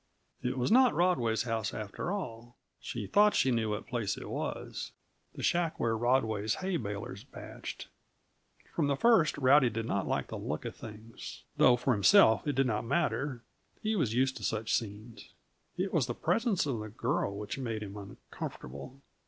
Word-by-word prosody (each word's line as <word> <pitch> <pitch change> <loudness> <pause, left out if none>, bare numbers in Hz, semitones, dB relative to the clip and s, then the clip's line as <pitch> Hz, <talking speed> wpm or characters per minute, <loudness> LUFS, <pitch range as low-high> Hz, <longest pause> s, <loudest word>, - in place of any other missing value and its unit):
It 125 +1 -2
was 125 +7 0
not 255 0 +6
Rodway's 120 - +2
house, 115 -3 -2
after 110 - -4
all. 120 - -5 0.2
She 115 -4 -5
thought 210 - +4
she 130 - +3
knew 115 -2 +1
what 105 0 -3
place 115 -6 -2
it - - -7
was - - -4 0.4
the - - -6
shack 170 -2 +1
where 115 -1 +1
Rodway's 110 -3 +1
hay 185 -1 -1
balers 100 -3 -5
bached. - - -8 0.9
From 155 -4 +1
the 140 - +2
first, 220 - +4
Rowdy 135 -1 +5
did 115 0 -3
not 100 -4 -1
like - - -1
the - - -5
look - - -4
of - - -5
things 110 +1 -10
though 125 - +6
for 125 +1 +1
himself 110 - +5
it 145 - 0
did 135 +1 +3
not 110 -4 0
matter; 135 -2 -1 0.4
he 220 +1 +1
was 145 - +1
used 130 +1 +2
to - - -9
such 110 0 -1
scenes. 110 +1 -4 0.5
It - - -1
was - - +2
the - - -3
presence 225 -7 +1
of 130 -6 -2
the 110 0 -6
girl 110 -3 -1
which 105 +5 -5
made 115 -4 -3
him 100 -1 -8
uncomfortable. 100 - -8
120 Hz, 175 wpm, -31 LUFS, 110-140 Hz, 0.9 s, not